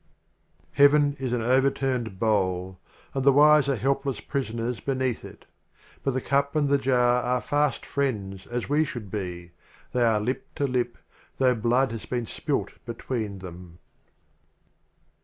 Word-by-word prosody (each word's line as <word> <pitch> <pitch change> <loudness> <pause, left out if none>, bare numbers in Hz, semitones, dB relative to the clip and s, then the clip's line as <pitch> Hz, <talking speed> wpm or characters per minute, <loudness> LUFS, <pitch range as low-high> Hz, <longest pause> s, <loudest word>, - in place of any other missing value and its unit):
LXXII - - -41
A. - - -29
Heaven 145 0 +5
is 130 -2 -2
an 120 -2 0
Overturned 130 -3 +1
Bowl, 95 -4 0 0.3
And 135 - -1
the 140 - +6
Wise 150 0 +6
are 140 - +2
Helpless 135 +2 -1
Prison 130 -5 -3
ers 115 -1 -2
beneath 130 0 -1
it. - - -12 0.6
But 135 -2 0
the 130 - 0
Cup 140 +2 0
and 145 -2 +2
the 140 0 +3
Jar 125 -2 +3
are 125 +1 0
Fast 145 +2 0
Friends 100 -9 -2
as 120 0 -3
we 150 +2 +3
should 120 -9 -6
be 90 -4 -5 0.2
— - - -28
They 125 - +2
are 110 -2 +3
Lip 125 +5 -3
to 145 - 0
Lip, 125 -2 -1 0.4
though 130 -1 +4
Blood 120 +3 +1
has 115 -1 -7
been 120 -2 -2
spilled - - -2
between 115 -3 -4
them. 85 -1 -11
125 Hz, 165 wpm, -26 LUFS, 110-135 Hz, 0.6 s, the